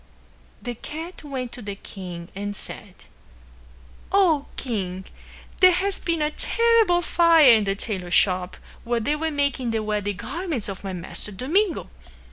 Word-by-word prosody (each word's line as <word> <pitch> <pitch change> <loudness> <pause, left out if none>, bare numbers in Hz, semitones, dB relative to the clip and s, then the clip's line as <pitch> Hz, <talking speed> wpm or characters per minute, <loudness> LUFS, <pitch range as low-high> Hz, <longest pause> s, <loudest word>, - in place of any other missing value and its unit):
The 245 - -3
cat 320 +9 -8
went 260 -4 -4
to 250 - -7
the 200 -2 -5
king 180 -4 -8
and 205 +1 -4
said, - - -9 1.1
"O 350 -7 +3
King, 190 -6 -4 0.5
there 370 -1 +7
has 390 +2 -1
been 335 -3 0
a 300 - 0
terrible 455 -4 +3
fire 330 -6 +6
in 215 -2 +3
the 195 0 0
tailor 195 -4 -4
shop 180 0 +2 0.3
where 235 0 0
they 290 +7 0
were 320 +1 -1
making 280 -4 0
the 225 -1 -1
wedding 205 -2 -2
garments 280 - -3
of 195 -1 -6
my 195 -1 -4
master, 180 +3 -4
Domingo. 330 - 0
250 Hz, 150 wpm, -24 LUFS, 200-330 Hz, 1.1 s, there